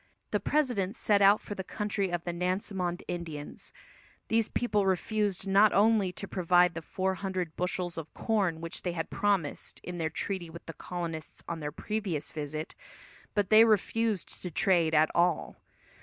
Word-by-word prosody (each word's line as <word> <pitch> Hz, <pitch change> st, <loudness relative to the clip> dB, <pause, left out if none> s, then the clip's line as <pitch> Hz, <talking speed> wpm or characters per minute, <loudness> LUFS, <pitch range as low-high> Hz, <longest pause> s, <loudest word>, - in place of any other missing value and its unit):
The -, -, +2 dB
president 245 Hz, -10 st, 0 dB
set 205 Hz, -3 st, +2 dB
out 200 Hz, +2 st, +6 dB
for -, -, -6 dB
the 190 Hz, -, -5 dB
country 205 Hz, -1 st, -2 dB
of 175 Hz, -1 st, -2 dB
the 175 Hz, -, -3 dB
Nansemond 180 Hz, 0 st, -2 dB
Indians. 160 Hz, -4 st, -6 dB, 0.6 s
These 225 Hz, 0 st, +2 dB
people 210 Hz, -5 st, +1 dB
refused 200 Hz, +1 st, 0 dB
not 200 Hz, +2 st, +5 dB
only 210 Hz, -2 st, +4 dB
to 200 Hz, -, -6 dB
provide 180 Hz, -1 st, +3 dB
the 165 Hz, -, -5 dB
four 190 Hz, +3 st, -1 dB
hundred 185 Hz, -4 st, -3 dB
bushels 180 Hz, -1 st, -2 dB
of 160 Hz, -, -9 dB
corn 195 Hz, -8 st, 0 dB
which 165 Hz, 0 st, -5 dB
they 175 Hz, -, -2 dB
had 165 Hz, -1 st, -4 dB
promised 200 Hz, -7 st, -1 dB
in 175 Hz, 0 st, -6 dB
their 160 Hz, -1 st, 0 dB
treaty 185 Hz, 0 st, -4 dB
with 170 Hz, +1 st, -11 dB
the 165 Hz, -, -7 dB
colonists 165 Hz, -1 st, -6 dB
on 170 Hz, -1 st, -4 dB
their 150 Hz, -1 st, -4 dB
previous 190 Hz, -4 st, -3 dB
visit, 155 Hz, +1 st, -4 dB, 0.6 s
but 205 Hz, -1 st, +1 dB
they 215 Hz, +1 st, +9 dB
refused 220 Hz, -1 st, +1 dB
to 180 Hz, -, -4 dB
trade 170 Hz, -2 st, +2 dB
at 155 Hz, +1 st, +4 dB
all. 170 Hz, -1 st, +1 dB
185 Hz, 170 wpm, -30 LUFS, 170-205 Hz, 0.6 s, they